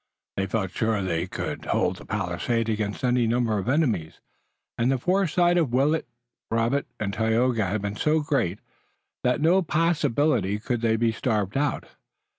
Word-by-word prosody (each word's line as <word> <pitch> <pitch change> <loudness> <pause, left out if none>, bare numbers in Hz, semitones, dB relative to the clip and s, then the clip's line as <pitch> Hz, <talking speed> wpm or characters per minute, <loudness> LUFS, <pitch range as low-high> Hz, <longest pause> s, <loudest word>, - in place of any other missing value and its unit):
They 95 0 -1
felt 95 -2 -2
sure 110 0 0
they 85 -1 -1
could - - -5
hold 90 +1 0
the - - -12
palisade 105 +4 -1
against 105 0 -2
any 125 -2 +2
number 115 -2 +1
of 100 - -3
enemies, 130 - 0 0.6
and 120 +3 +1
the 135 - +2
foresight 175 +2 +2
of 145 -8 0
Willet, 145 +5 +2 0.4
Robert 115 +5 0
and 100 -2 -2
Tayoga 110 0 +1
had 100 +2 -2
been 100 0 -3
so 155 +5 +2
great 135 - 0 0.7
that 125 +4 +1
by - - +4
no 185 +3 +5
possibility 150 - +1
could 120 +2 -3
they 115 -1 +2
be 115 0 +2
starved 105 -4 -1
out. 145 0 0
115 Hz, 165 wpm, -25 LUFS, 105-140 Hz, 0.7 s, no